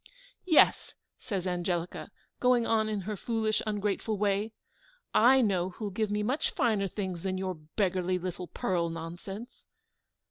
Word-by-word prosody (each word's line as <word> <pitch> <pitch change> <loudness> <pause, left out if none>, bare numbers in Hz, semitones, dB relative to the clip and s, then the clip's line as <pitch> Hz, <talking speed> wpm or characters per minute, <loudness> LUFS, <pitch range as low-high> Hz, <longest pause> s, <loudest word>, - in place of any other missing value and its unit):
"Yes," 320 -4 +4 0.2
said 200 -8 -3
Angelica, 175 -1 -2 0.3
going 250 -2 +4
on 220 -1 +2
in 210 -2 -1
her 210 +3 -4
foolish 220 +1 0
ungrateful 210 +1 -1
way, 205 +2 +1 0.6
"I 260 +4 +6
know 185 -5 +1
who'll 205 +2 -5
give 215 +2 -1
me 210 0 0
much 260 +8 0
finer 220 -7 +1
things 185 -3 -4
than 190 0 -2
your 185 0 -2
beggarly 180 +3 -1
little 180 0 -5
pearl 170 -2 -1
nonsense." 175 +7 -8
200 Hz, 140 wpm, -30 LUFS, 180-220 Hz, 0.6 s, I